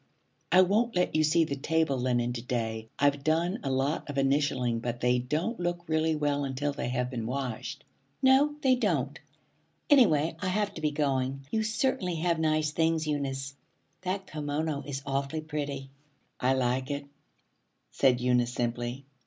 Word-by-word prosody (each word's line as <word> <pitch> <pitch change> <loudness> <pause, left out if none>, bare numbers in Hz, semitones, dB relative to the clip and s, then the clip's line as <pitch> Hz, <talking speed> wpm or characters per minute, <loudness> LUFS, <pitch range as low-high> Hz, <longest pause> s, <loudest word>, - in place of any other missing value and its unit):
'I 180 +2 +7
won't 215 +5 +1
let 180 -2 +1
you 155 - +4
see 155 +2 +4
the 140 -3 -2
table 160 +1 +1
linen 120 -1 0
to 120 - -4
day. 115 -2 -3
I've 145 0 +2
done 170 +5 +1
a 135 - -3
lot 135 +4 -1
of 145 - -4
initialing, 135 -4 +1
but 120 0 -3
they 125 +1 +2
don't 155 - -2
look 175 0 -2
really 160 0 +1
well 145 -1 0
until 140 +2 -2
they 130 - -3
have 125 0 -1
been 115 -3 -3
washed.' 135 +2 -4 0.4
'No, 270 +3 +4
they 260 -1 +4
don't. 160 - 0 0.7
Anyway 165 - +5
I 185 - -2
have 205 +2 0
to 160 - -8
be 155 - +2
going. 135 -2 -1
You 220 - +1
certainly 220 -4 0
have 165 0 0
nice 155 -1 +1
things, 160 0 +1
Eunice. 140 -2 -2 0.5
That 190 +1 -2
kimono 150 -2 -2
is 135 -1 -4
awfully 140 +3 -2
pretty.' 145 -3 -4 0.5
'I 130 +1 +3
like 130 +1 0
it,' 140 0 -3 0.9
said 125 -2 +3
Eunice 125 -1 +2
simply. 120 +2 -3
145 Hz, 165 wpm, -29 LUFS, 130-165 Hz, 0.9 s, I